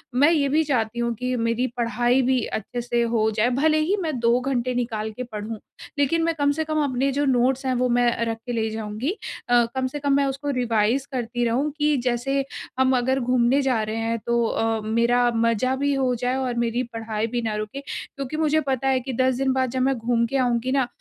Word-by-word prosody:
मैं 285 Hz, +5 st, +5 dB
ये 295 Hz, -4 st, +2 dB
भी 310 Hz, +3 st, +3 dB
चाहती 240 Hz, -5 st, -1 dB
हूँ 235 Hz, 0 st, 0 dB
कि 250 Hz, +2 st, -2 dB
मेरी 230 Hz, +1 st, 0 dB
पढ़ाई 240 Hz, +2 st, +2 dB
भी 255 Hz, -1 st, +1 dB
अच्छे 240 Hz, +3 st, -4 dB
से 240 Hz, 0 st, 0 dB
हो 230 Hz, -2 st, +1 dB
जाए, 215 Hz, +2 st, +2 dB
भले 305 Hz, +5 st, +2 dB
ही 330 Hz, +6 st, +1 dB
मैं 310 Hz, -6 st, -2 dB
2 235 Hz, +1 st, +3 dB
घंटे 255 Hz, -1 st, -1 dB
निकाल 225 Hz, -3 st, -2 dB
के 250 Hz, +4 st, -6 dB
पढूँ। 220 Hz, -2 st, -6 dB, 0.4 s
लेकिन 325 Hz, +4 st, +2 dB
मैं 330 Hz, 0 st, +1 dB
कम 285 Hz, -2 st, +2 dB
से 315 Hz, +2 st, -1 dB
कम 310 Hz, -1 st, 0 dB
अपने 270 Hz, 0 st, 0 dB
जो 285 Hz, +2 st, 0 dB
नोट्स 260 Hz, 0 st, +2 dB
हैं, 260 Hz, -, +1 dB
वो 250 Hz, 0 st, +1 dB
मैं 245 Hz, 0 st, +3 dB, 0.2 s
रख 225 Hz, -1 st, -2 dB
के 245 Hz, -, -4 dB
ले 220 Hz, -1 st, 0 dB
जाऊँगी। 220 Hz, +5 st, -3 dB, 0.4 s
अ, 240 Hz, -1 st, +5 dB
कम 260 Hz, 0 st, 0 dB
से 290 Hz, +3 st, -6 dB
कम 285 Hz, -1 st, +1 dB
मैं 280 Hz, 0 st, +3 dB
उसको 275 Hz, +2 st, -3 dB
रिवाइज़ 240 Hz, +1 st, +1 dB
करती 240 Hz, -1 st, -2 dB
रहूँ 250 Hz, +6 st, +1 dB
कि 300 Hz, -1 st, +2 dB
जैसे 270 Hz, +3 st, 0 dB, 0.3 s
हम 260 Hz, 0 st, +4 dB
अगर 260 Hz, +2 st, +1 dB
घूमने 250 Hz, +2 st, +2 dB
जा 255 Hz, -5 st, +1 dB
रहे 215 Hz, +1 st, -3 dB
हैं। 225 Hz, +1 st, -1 dB
तो 235 Hz, 0 st, +2 dB
अ, 225 Hz, 0 st, 0 dB
मेरा 235 Hz, +2 st, +2 dB
मज़ा 230 Hz, +3 st, +1 dB
भी 285 Hz, +1 st, 0 dB
हो 265 Hz, -2 st, +1 dB
जाए 250 Hz, +2 st, -1 dB
और 260 Hz, -2 st, -1 dB
मेरी 235 Hz, +2 st, -1 dB
पढ़ाई 225 Hz, -1 st, -2 dB
भी 240 Hz, +1 st, -2 dB
ना 220 Hz, -2 st, -2 dB
रुके। 215 Hz, +5 st, -4 dB
क्योंकि 275 Hz, 0 st, -6 dB
मुझे 310 Hz, 0 st, +2 dB
पता 270 Hz, 0 st, 0 dB
है 265 Hz, -1 st, +3 dB
कि 260 Hz, +1 st, -5 dB
10 255 Hz, +1 st, +2 dB
दिन 265 Hz, 0 st, +1 dB
बाद 260 Hz, -1 st, +1 dB
जब 260 Hz, 0 st, -1 dB
मैं 270 Hz, +1 st, +2 dB
घूम 235 Hz, 0 st, +1 dB
के 270 Hz, +4 st, -1 dB
आऊँगी 250 Hz, -1 st, +1 dB
ना, 265 Hz, -2 st, +2 dB
250 Hz, 230 wpm, -23 LUFS, 230-270 Hz, 0.4 s, मैं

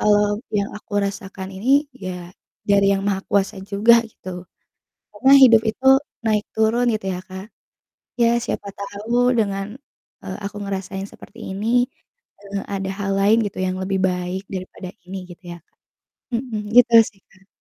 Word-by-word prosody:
eee, 205 Hz, 0 st, +4 dB, 0.3 s
yang 200 Hz, -, -5 dB
aku 205 Hz, -, -22 dB
rasakan 195 Hz, -1 st, -6 dB
ini 200 Hz, +6 st, -5 dB, 0.4 s
ya 180 Hz, -1 st, -6 dB, 0.4 s
dari 200 Hz, 0 st, +4 dB
Yang 195 Hz, -, 0 dB
Maha 195 Hz, -1 st, 0 dB
Kuasa 200 Hz, -1 st, +1 dB
juga 215 Hz, +4 st, +5 dB, 0.2 s
gitu, 185 Hz, -, -13 dB, 0.9 s
karena 265 Hz, +6 st, +3 dB
hidup 230 Hz, -3 st, +8 dB
itu 260 Hz, +4 st, -7 dB, 0.4 s
naik 215 Hz, -1 st, +1 dB
turun 220 Hz, +3 st, +2 dB
gitu 210 Hz, -3 st, -4 dB
ya 180 Hz, -, -5 dB
Kak, 190 Hz, +2 st, -8 dB, 0.7 s
ya 230 Hz, -, +5 dB, 0.2 s
siapa 200 Hz, -, -4 dB
tahu 220 Hz, +5 st, 0 dB
dengan, 195 Hz, -2 st, 0 dB, 0.6 s
eee, -, -, -5 dB
aku 205 Hz, +1 st, -5 dB
ngerasain 195 Hz, 0 st, -4 dB
seperti 225 Hz, -, -14 dB
ini, 200 Hz, +3 st, -4 dB, 0.7 s
eee, 200 Hz, -1 st, -5 dB
ada 195 Hz, 0 st, -3 dB
hal 195 Hz, -1 st, -1 dB
lain 215 Hz, +3 st, +4 dB
gitu 200 Hz, -, -7 dB
yang 185 Hz, 0 st, -2 dB
lebih 190 Hz, +1 st, -1 dB
baik 180 Hz, +1 st, -3 dB
daripada 185 Hz, 0 st, -7 dB, 0.2 s
ini 190 Hz, +1 st, -6 dB
gitu 175 Hz, +2 st, -13 dB
ya, 170 Hz, -, -9 dB
Kak. -, -, -47 dB, 0.6 s
Mhm, 230 Hz, -2 st, -2 dB, 0.2 s
gitu 240 Hz, -1 st, +6 dB, 0.2 s
sih 195 Hz, -3 st, -28 dB
Kak. 190 Hz, 0 st, -25 dB
200 Hz, 155 wpm, -21 LUFS, 190-215 Hz, 0.9 s, hidup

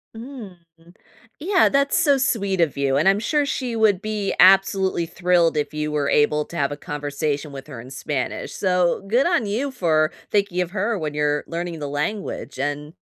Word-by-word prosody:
Mm. 230 Hz, -6 st, -9 dB, 0.8 s
Yeah, 370 Hz, +4 st, +3 dB
that's 280 Hz, 0 st, +2 dB
so 285 Hz, -4 st, +4 dB
sweet 200 Hz, -8 st, 0 dB
of 155 Hz, -5 st, +1 dB
you, 135 Hz, -1 st, +1 dB
and 155 Hz, -, +2 dB
I'm 195 Hz, +1 st, +2 dB
sure 290 Hz, +6 st, +1 dB
she 255 Hz, -4 st, -3 dB
would 215 Hz, -4 st, +3 dB
be 210 Hz, -2 st, -2 dB
absolutely 190 Hz, -1 st, +4 dB
thrilled 175 Hz, -1 st, +1 dB
if 150 Hz, 0 st, -2 dB
you 150 Hz, 0 st, -2 dB
were 145 Hz, -2 st, 0 dB
able 150 Hz, 0 st, +2 dB
to -, -, -12 dB
have 140 Hz, -2 st, 0 dB
a 145 Hz, -, -5 dB
conversation 145 Hz, 0 st, -3 dB
with 135 Hz, 0 st, -9 dB
her 135 Hz, -6 st, -9 dB
in 130 Hz, +3 st, -12 dB
Spanish, 135 Hz, 0 st, -4 dB
so 180 Hz, -2 st, +1 dB
good 245 Hz, +9 st, +2 dB
on 345 Hz, -10 st, +1 dB
you 230 Hz, +8 st, -2 dB
for 155 Hz, -8 st, +1 dB, 0.2 s
thinking 200 Hz, -3 st, +1 dB
of 180 Hz, -, -3 dB
her 210 Hz, +3 st, -1 dB
when 155 Hz, -4 st, -4 dB
you're 150 Hz, 0 st, 0 dB
learning 170 Hz, -1 st, -4 dB
the 145 Hz, -1 st, -4 dB
language, 160 Hz, +9 st, -4 dB
and, 145 Hz, +2 st, -3 dB
175 Hz, 190 wpm, -22 LUFS, 150-215 Hz, 0.8 s, so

